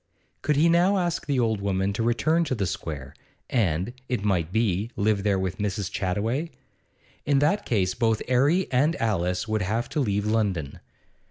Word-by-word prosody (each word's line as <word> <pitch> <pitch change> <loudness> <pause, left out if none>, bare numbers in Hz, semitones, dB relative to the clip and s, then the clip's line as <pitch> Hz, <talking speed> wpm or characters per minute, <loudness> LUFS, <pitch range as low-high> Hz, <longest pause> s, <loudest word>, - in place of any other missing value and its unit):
Could 150 - +1
he 155 +4 +4
now 175 +4 +4
ask 175 -4 -1
the 140 -3 +1
old 110 -4 +1
woman 100 0 0
to 105 - -2
return 155 +9 +2
to 135 - -1
the 100 -4 -1
Square, 70 -6 -5 0.4
and, 95 -2 0 0.2
it 125 -5 -1
might 90 -5 0
be, 105 -1 0
live 105 0 +1
there 100 -1 +1
with 95 0 -3
Mrs. 100 -2 -2
Chattaway? 110 - -1 0.7
In 145 -1 +2
that 150 +9 +1
case 95 -5 +1
both 115 -2 0
'Arry 140 +9 +3
and 145 +6 +2
Alice 90 -4 -1
would 110 -1 0
have 110 +6 -1
to 155 - -2
leave 105 -6 0
London. 100 -10 -1
110 Hz, 175 wpm, -25 LUFS, 95-135 Hz, 0.7 s, he